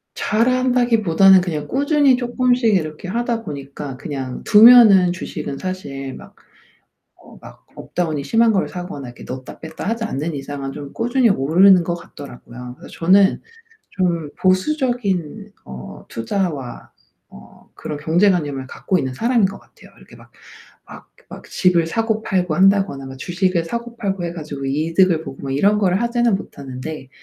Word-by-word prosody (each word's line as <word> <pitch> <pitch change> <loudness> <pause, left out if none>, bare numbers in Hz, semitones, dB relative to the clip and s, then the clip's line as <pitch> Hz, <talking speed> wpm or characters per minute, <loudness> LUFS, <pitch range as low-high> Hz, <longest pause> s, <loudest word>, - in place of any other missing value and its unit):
잘한다기보다는 230 -6 +3
그냥 155 -5 -4
꾸준히 285 -1 +2
쪼끔씩 245 -2 +1
이렇게 155 0 -3
하다 235 +2 -2
보니까 140 -2 -7
그냥 135 -3 -6
두면은 210 -5 +7
주식은 155 -5 -6
사실 140 -8 -6
막 - - -14 0.9
어 - - -16
막 - - -15
업 - - -13
다운이 160 -5 -1
심한 230 0 +3
거를 195 - 0
사거나 175 -8 -7
이렇게 120 - -12
넣었다 130 +1 -8
뺐다 160 +5 -7
하지 230 0 -2
않는 155 -3 -3
이상은 135 -1 -6
좀 140 -1 -9
꾸준히 240 +1 +1
오르는 180 +3 +5
것 175 - -2
같더라고요. 125 -5 -11
그래서 - - -13
저는 190 +4 +4 0.5
좀 170 -5 -1
보수적인 200 - -1
어 65 -1 -10
투자와 145 - -4 0.4
어 65 - -17
그런 150 -2 -6
경제관념을 160 -5 +1
갖고 185 - -1
있는 130 -1 -3
사람인 230 - +2
것 200 - -7
같아요. - - -20
이렇게 - - -17
막 - - -18 0.6
막 - - -12 0.2
막 - - -11
집을 175 -3 +2
사고 220 +3 -1
팔고 180 -6 -1
한다거나 195 -8 +2
뭐 130 0 -9
주식을 175 +3 -1
사고 235 +6 -6
팔고 195 -5 -3
해 170 - -4
가지고 150 -4 -7
이득을 165 +4 +1
보고 135 - -9
막 135 - -3
이런 200 +8 +3
거를 195 +1 +1
하지는 235 -2 +1
못하는데 135 -4 -7
180 Hz, 335 characters per minute, -19 LUFS, 145-215 Hz, 0.9 s, 두면은